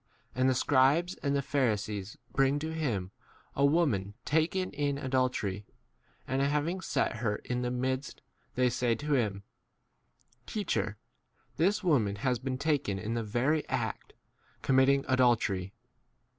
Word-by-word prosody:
8 -, -, -6 dB
And 130 Hz, -, +5 dB
the 130 Hz, -, +2 dB
scribes 145 Hz, +7 st, +3 dB
and 140 Hz, -1 st, 0 dB
the 140 Hz, -, 0 dB
Pharisees 110 Hz, -7 st, -1 dB
bring 135 Hz, +1 st, +2 dB
to 160 Hz, +2 st, -4 dB
him 110 Hz, -, -2 dB, 0.4 s
a 140 Hz, -, +1 dB
woman 140 Hz, -, +2 dB
taken 165 Hz, +5 st, +1 dB
in 145 Hz, -1 st, -1 dB
adultery, 130 Hz, -7 st, -1 dB, 0.6 s
and 130 Hz, +2 st, 0 dB
having 150 Hz, +6 st, 0 dB
set 120 Hz, -, -1 dB
her 110 Hz, -3 st, 0 dB
in 125 Hz, 0 st, -1 dB
4 -, -, -2 dB
the 125 Hz, -, -1 dB
midst, 130 Hz, +2 st, -2 dB, 0.3 s
they 125 Hz, 0 st, +3 dB
say 120 Hz, -1 st, +1 dB
to 145 Hz, +5 st, -2 dB
him, 105 Hz, -7 st, 0 dB, 1.0 s
Teach 205 Hz, -5 st, -2 dB
er, 105 Hz, +1 st, -1 dB, 0.6 s
this 195 Hz, +7 st, +2 dB
woman 120 Hz, -, +2 dB
has 125 Hz, +3 st, 0 dB
been 130 Hz, 0 st, -3 dB
taken 140 Hz, -9 st, 0 dB
in 105 Hz, +4 st, -3 dB
the 115 Hz, -, -1 dB
very 125 Hz, +8 st, +1 dB
act, -, -, -3 dB, 0.5 s
committing 135 Hz, +1 st, +4 dB
adultery. 115 Hz, -7 st, +2 dB
130 Hz, 145 wpm, -30 LUFS, 110-145 Hz, 1.0 s, And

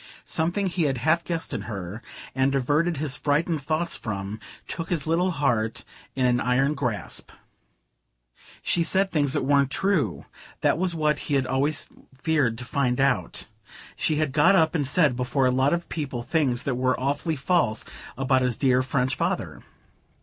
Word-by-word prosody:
Something 175 Hz, +5 st, -1 dB
he 175 Hz, -3 st, 0 dB
had 135 Hz, -3 st, 0 dB
half 160 Hz, +6 st, +2 dB
guessed 165 Hz, -1 st, -3 dB
in -, -, -2 dB
her, 100 Hz, +1 st, -6 dB, 0.3 s
and 135 Hz, +1 st, +1 dB
averted 150 Hz, +5 st, +1 dB
his 140 Hz, -2 st, 0 dB
frightened 155 Hz, +2 st, 0 dB
thoughts 160 Hz, +4 st, -1 dB
from, 100 Hz, -2 st, -5 dB, 0.3 s
took 165 Hz, -1 st, -5 dB
his 165 Hz, -6 st, 0 dB
little 170 Hz, +3 st, +2 dB
heart 115 Hz, -8 st, 0 dB, 0.3 s
in 130 Hz, -1 st, +1 dB
an 120 Hz, -1 st, +3 dB
iron 135 Hz, +4 st, +2 dB
grasp. 125 Hz, -8 st, -3 dB, 1.3 s
She 175 Hz, -, +2 dB
said 190 Hz, +3 st, +1 dB
things 145 Hz, -4 st, +2 dB
that -, -, +1 dB
weren't 140 Hz, -1 st, +3 dB
true.... 190 Hz, +1 st, 0 dB, 0.4 s
That -, -, +2 dB
was 180 Hz, -2 st, 0 dB
what 150 Hz, -2 st, +1 dB
he 145 Hz, -, +2 dB
had 135 Hz, -1 st, +2 dB
always 140 Hz, +4 st, 0 dB, 0.3 s
feared 140 Hz, -7 st, +1 dB
to 125 Hz, -, -7 dB
find 125 Hz, -1 st, 0 dB
out.... 135 Hz, -1 st, 0 dB, 0.5 s
She 155 Hz, -, +1 dB
had 155 Hz, -2 st, 0 dB
got 150 Hz, +7 st, +5 dB
up 160 Hz, -3 st, +3 dB
and 145 Hz, -5 st, 0 dB
said 145 Hz, -2 st, +3 dB
before 130 Hz, +2 st, 0 dB
a 125 Hz, -, +4 dB
lot 130 Hz, +3 st, +2 dB
of 170 Hz, 0 st, -1 dB
people 135 Hz, -6 st, -4 dB
things 130 Hz, -3 st, +1 dB
that 140 Hz, -, -1 dB
were 130 Hz, +1 st, 0 dB
awfully 145 Hz, +5 st, -1 dB
false 140 Hz, -6 st, +1 dB, 0.3 s
about 130 Hz, 0 st, +2 dB
his 125 Hz, -3 st, 0 dB
dear 130 Hz, -2 st, +3 dB
French 130 Hz, 0 st, 0 dB
father.... -, -, -2 dB
140 Hz, 170 wpm, -25 LUFS, 125-160 Hz, 1.3 s, got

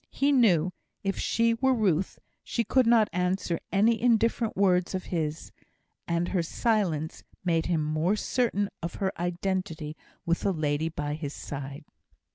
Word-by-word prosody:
He 280 Hz, +1 st, +1 dB
knew, 185 Hz, -, +4 dB, 0.3 s
if 195 Hz, 0 st, -1 dB
she 230 Hz, 0 st, +2 dB
were 260 Hz, +3 st, +2 dB
Ruth, 190 Hz, -5 st, +1 dB, 0.3 s
she 235 Hz, -, -1 dB
could 255 Hz, +1 st, +3 dB
not 230 Hz, -2 st, +5 dB
answer 180 Hz, -1 st, 0 dB
any 220 Hz, +3 st, +3 dB
indifferent 230 Hz, -1 st, +2 dB
words 185 Hz, -2 st, +2 dB
of 185 Hz, -, -3 dB
his; 155 Hz, -2 st, -2 dB, 0.6 s
and 170 Hz, +1 st, 0 dB
her 185 Hz, -, +1 dB
silence 170 Hz, -4 st, -1 dB, 0.2 s
made 165 Hz, -2 st, +1 dB
him 165 Hz, -3 st, +1 dB
more 155 Hz, +6 st, +1 dB
certain 215 Hz, -3 st, 0 dB
of 170 Hz, 0 st, -4 dB
her 190 Hz, -1 st, -1 dB
identity 175 Hz, -3 st, -2 dB, 0.3 s
with 170 Hz, 0 st, +1 dB
the 200 Hz, -, 0 dB
lady 155 Hz, 0 st, 0 dB
by 145 Hz, -2 st, -3 dB
his 150 Hz, -2 st, -5 dB
side. 140 Hz, +1 st, -7 dB
180 Hz, 150 wpm, -28 LUFS, 160-215 Hz, 0.6 s, not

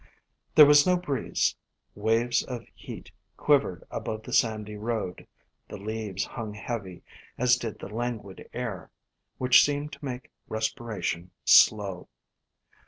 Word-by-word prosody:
There 150 Hz, -, +11 dB
was 145 Hz, +3 st, +6 dB
no 180 Hz, 0 st, +4 dB
breeze; 145 Hz, -8 st, -1 dB, 0.4 s
waves 115 Hz, +3 st, +1 dB
of 120 Hz, -3 st, -6 dB
heat -, -, -10 dB, 0.3 s
quivered -, -, +2 dB
above 110 Hz, 0 st, -4 dB
the -, -, -8 dB
sandy 105 Hz, -2 st, +1 dB
road; 105 Hz, -4 st, -4 dB, 0.4 s
the -, -, -8 dB
leaves 105 Hz, -2 st, -3 dB
hung 110 Hz, -3 st, -6 dB
heavy, 105 Hz, -5 st, -6 dB, 0.3 s
as 125 Hz, 0 st, +4 dB
did 115 Hz, -3 st, -5 dB
the -, -, -8 dB
languid 110 Hz, -3 st, -5 dB
air, 115 Hz, -7 st, -5 dB, 0.5 s
which 125 Hz, -1 st, +6 dB
seemed 145 Hz, +1 st, -1 dB
to 140 Hz, +2 st, -12 dB
make 125 Hz, -2 st, -6 dB, 0.2 s
respira 110 Hz, 0 st, -3 dB
tion 85 Hz, +1 st, -2 dB, 0.2 s
slow. 100 Hz, -4 st, +5 dB
115 Hz, 130 wpm, -27 LUFS, 105-125 Hz, 0.5 s, There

